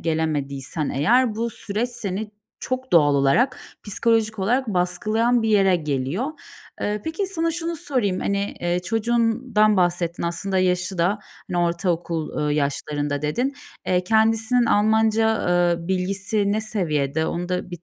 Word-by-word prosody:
gelemediysen 150 Hz, -2 st, -2 dB
eğer, 230 Hz, -, +3 dB
bu 230 Hz, +2 st, -2 dB
süreç 215 Hz, +2 st, -3 dB
seni 210 Hz, -3 st, -4 dB, 0.3 s
çok 255 Hz, 0 st, -4 dB
doğal 145 Hz, -4 st, +5 dB
olarak, 140 Hz, -, +2 dB, 0.3 s
psikolojik 220 Hz, +1 st, +1 dB
olarak 240 Hz, +6 st, +1 dB
baskılayan 215 Hz, +6 st, +1 dB
bir 225 Hz, -, 0 dB
yere 195 Hz, -3 st, +4 dB
geliyor. 150 Hz, -, -2 dB, 0.5 s
Eee, 210 Hz, 0 st, -1 dB
peki, 325 Hz, +5 st, -2 dB
sana 330 Hz, -3 st, -1 dB
şunu 335 Hz, 0 st, -3 dB
sorayım. 235 Hz, -11 st, -1 dB
Hani, 200 Hz, 0 st, -1 dB
eee, 175 Hz, +1 st, 0 dB
çocuğundan 225 Hz, 0 st, +2 dB
bahsettin. 175 Hz, -1 st, 0 dB
Aslında 180 Hz, +3 st, -1 dB
yaşı 180 Hz, 0 st, 0 dB
da 180 Hz, +5 st, +2 dB, 0.3 s
hani, 175 Hz, -, -1 dB
ortaokul, 170 Hz, -3 st, -1 dB
eee, 145 Hz, -, +1 dB
yaşlarında 145 Hz, 0 st, -2 dB
dedin. 245 Hz, -, -1 dB, 0.3 s
Eee, 180 Hz, 0 st, +1 dB
kendisinin 225 Hz, +3 st, +3 dB
Almanca, 220 Hz, 0 st, +2 dB
eee, 175 Hz, -1 st, +1 dB
bilgisi 195 Hz, +2 st, 0 dB
ne 215 Hz, -, 0 dB
seviyede? 160 Hz, -8 st, -1 dB
Onu 175 Hz, +2 st, -3 dB
da 180 Hz, 0 st, -3 dB
bit 175 Hz, -1 st, -8 dB
195 Hz, 140 wpm, -23 LUFS, 170-225 Hz, 0.5 s, doğal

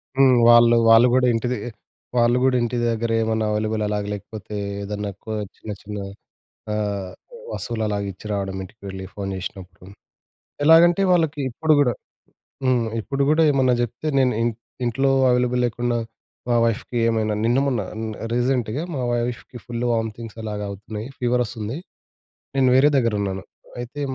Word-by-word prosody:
హ్మ్. 135 Hz, -1 st, +5 dB
వాళ్ళూ, 120 Hz, 0 st, +7 dB
వాళ్ళు 115 Hz, +2 st, +7 dB
గూడా 125 Hz, 0 st, +4 dB
ఇంటి 115 Hz, +2 st, -1 dB
దె -, -, -2 dB, 0.6 s
వాళ్ళు 120 Hz, +1 st, +4 dB
గూడా 130 Hz, -1 st, +3 dB
ఇంటి 120 Hz, +1 st, -1 dB
దగ్గరేమన్నా 115 Hz, -1 st, 0 dB
అవైలబుల్ 110 Hz, +1 st, -1 dB
అలాగ 105 Hz, 0 st, -1 dB
లేకపోతే, 105 Hz, +1 st, -8 dB, 0.3 s
ఏదన్నా 105 Hz, 0 st, -4 dB
కో 110 Hz, -, -6 dB, 0.2 s
చిన్న 110 Hz, -, -8 dB
చిన్న 105 Hz, 0 st, -7 dB, 0.8 s
ఆహ్, 100 Hz, -3 st, -2 dB, 0.4 s
వస్తువులలాగా 105 Hz, -3 st, -2 dB
ఇచ్చి 95 Hz, -, -13 dB
రావడం 95 Hz, -1 st, -2 dB
ఇంటికి 100 Hz, +4 st, -13 dB
వెళ్ళి 95 Hz, 0 st, -6 dB
ఫోన్ 100 Hz, -1 st, -4 dB
చేసినప్పుడు. 95 Hz, -1 st, -8 dB, 0.8 s
ఎలాగంటే, 170 Hz, +4 st, +6 dB
వాళ్ళకి 160 Hz, -4 st, +2 dB
ఇప్పుడు 155 Hz, +6 st, +2 dB
గూడా 125 Hz, -4 st, +3 dB, 0.7 s
హ్మ్. 125 Hz, -3 st, +2 dB
ఇప్పుడు 135 Hz, +5 st, -1 dB
గూడేమన్నా 145 Hz, -5 st, +4 dB
జెప్తే 120 Hz, +5 st, -3 dB
నేను 130 Hz, -1 st, +3 dB
ఇన్ 120 Hz, -, +1 dB, 0.3 s
ఇంట్లో 135 Hz, +3 st, +1 dB, 0.2 s
అవైలబుల్ 125 Hz, 0 st, +2 dB
లేకున్నా, 120 Hz, 0 st, -1 dB, 0.5 s
మా 120 Hz, -, +3 dB
వైఫ్‌కి 115 Hz, +2 st, -2 dB
ఏమైనా. 110 Hz, -1 st, 0 dB
నిన్న, 120 Hz, +3 st, +2 dB
మొన్న 125 Hz, -5 st, 0 dB
అన్ 110 Hz, 0 st, -4 dB, 0.3 s
రీసెంట్‌గా 125 Hz, +1 st, 0 dB
మా 130 Hz, -, -2 dB
వైఫ్‌కి 120 Hz, +1 st, -3 dB
ఫుల్లు 120 Hz, 0 st, -3 dB
వామితింగ్స్ 115 Hz, 0 st, -4 dB
అలాగా 105 Hz, -1 st, -4 dB
అవుతున్నాయి, 105 Hz, +3 st, -7 dB
ఫీవరొస్తుంది. 120 Hz, -1 st, -1 dB, 0.8 s
నేను 130 Hz, -1 st, +4 dB
వేరే 135 Hz, +3 st, +6 dB
దగ్గరున్నాను. 100 Hz, -6 st, 0 dB, 0.4 s
అయితే 120 Hz, +4 st, -6 dB
115 Hz, 140 wpm, -22 LUFS, 105-125 Hz, 0.8 s, వాళ్ళూ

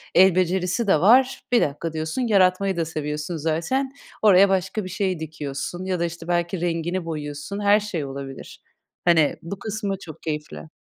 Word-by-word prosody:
el 190 Hz, -1 st, +7 dB
becerisi 185 Hz, +4 st, +1 dB
de 155 Hz, -5 st, +4 dB
var. 255 Hz, +6 st, +5 dB
Bir 240 Hz, -, +5 dB
dakika 155 Hz, +3 st, -2 dB
diyorsun, 160 Hz, +10 st, -2 dB
yaratmayı 195 Hz, -4 st, +3 dB
da 165 Hz, -, 0 dB
seviyorsun 150 Hz, +1 st, -4 dB
zaten, 170 Hz, -, -1 dB, 0.3 s
oraya 200 Hz, -2 st, +6 dB
başka 195 Hz, +2 st, 0 dB
bir 185 Hz, -, -6 dB
şey 185 Hz, -3 st, -1 dB
dikiyorsun 155 Hz, +3 st, -5 dB
ya 185 Hz, -2 st, -1 dB
da, 170 Hz, -, +1 dB
işte, 170 Hz, 0 st, -7 dB
belki 175 Hz, 0 st, -1 dB
rengini 175 Hz, +1 st, -1 dB
boyuyorsun. 150 Hz, +4 st, -5 dB
Her 205 Hz, +1 st, +4 dB
şey 185 Hz, -8 st, -4 dB
olabilir. 135 Hz, 0 st, -8 dB, 0.4 s
Hani, 165 Hz, -4 st, +4 dB
bu 185 Hz, +4 st, -7 dB
kısmı 205 Hz, -3 st, -3 dB
çok 165 Hz, -5 st, -11 dB
keyifli. 150 Hz, -, -5 dB
175 Hz, 165 wpm, -23 LUFS, 155-195 Hz, 0.4 s, el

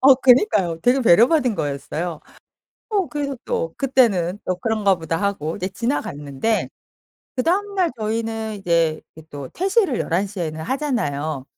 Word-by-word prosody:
어 270 Hz, +1 st, +8 dB
그니까요 245 Hz, -, +3 dB
되려 250 Hz, +2 st, +3 dB
배려받은 245 Hz, -, +4 dB
거였어요. 155 Hz, +2 st, -3 dB, 0.7 s
어 395 Hz, -5 st, +1 dB
그래서 280 Hz, -1 st, -3 dB
또 -, -, -2 dB
그때는 215 Hz, -10 st, +2 dB
또 185 Hz, -, -1 dB
'그런가 205 Hz, -1 st, +1 dB
보다.' 165 Hz, -1 st, -3 dB
하고 180 Hz, -6 st, -1 dB
이제 185 Hz, -, -3 dB
지나갔는데 195 Hz, -, -2 dB, 0.7 s
그다음 395 Hz, +9 st, 0 dB
날 365 Hz, -3 st, +2 dB
저희는 220 Hz, 0 st, -2 dB
이제 170 Hz, -4 st, +1 dB
이렇게 160 Hz, 0 st, -14 dB
또 140 Hz, -2 st, -7 dB
퇴실을 385 Hz, -, +1 dB
11:00 195 Hz, +3 st, -1 dB
에는 160 Hz, -2 st, -3 dB
하잖아요. 160 Hz, -, -2 dB
215 Hz, 310 characters per minute, -21 LUFS, 165-270 Hz, 0.7 s, 어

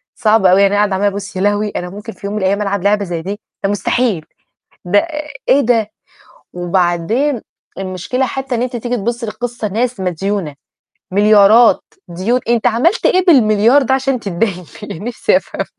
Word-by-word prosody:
صعبة 210 Hz, -4 st, +3 dB
أوي، 195 Hz, +2 st, +5 dB
يعني 200 Hz, +1 st, +3 dB
أقعدة 205 Hz, -2 st, +1 dB
عمالة 205 Hz, +2 st, +1 dB
أبُصّ 200 Hz, +1 st, -5 dB
يا 185 Hz, -, -2 dB
لهوي! 205 Hz, +1 st, +1 dB
أنا 180 Hz, -2 st, -5 dB
ممكن 210 Hz, +4 st, -9 dB
في 200 Hz, -, -8 dB
يوم 205 Hz, -, -4 dB
من 210 Hz, -, -2 dB
الأيام 200 Hz, +2 st, +1 dB
ألعب 200 Hz, -2 st, -2 dB
لعبة 205 Hz, 0 st, +2 dB
زي 170 Hz, -2 st, -4 dB
دي؟ 200 Hz, +4 st, -5 dB, 0.2 s
ده 195 Hz, -, +1 dB
مستحيل! 205 Hz, -4 st, 0 dB, 0.6 s
ده 205 Hz, +3 st, +4 dB, 0.5 s
إيه 280 Hz, -, +5 dB
ده؟ 225 Hz, -3 st, +1 dB, 0.6 s
وبعدين 180 Hz, -, 0 dB, 0.4 s
المشكلة 190 Hz, +8 st, -2 dB
حتى 270 Hz, -1 st, -4 dB
إن 230 Hz, -, -2 dB
أنتِ 250 Hz, -1 st, -3 dB
تيجي 240 Hz, +1 st, -2 dB
تبُصّي 235 Hz, +3 st, -3 dB
للقصّة 235 Hz, 0 st, -4 dB
ناس 235 Hz, +2 st, -2 dB
مديونة، 180 Hz, -3 st, -2 dB, 0.6 s
مليارات، 210 Hz, +3 st, +5 dB, 0.3 s
ديون 195 Hz, +9 st, -1 dB
أنت 235 Hz, -2 st, +1 dB
عملت 270 Hz, -, +2 dB
إيه 370 Hz, 0 st, +3 dB
بال1.000.000.000 235 Hz, -, +5 dB
ده 265 Hz, +1 st, +1 dB
عشان 265 Hz, -2 st, -1 dB
تتداين 185 Hz, -2 st, -2 dB, 0.2 s
بيه -, -, -7 dB
نفسي 240 Hz, +1 st, +1 dB
أفهم؟! -, -, -3 dB
210 Hz, 170 wpm, -16 LUFS, 195-240 Hz, 0.6 s, أوي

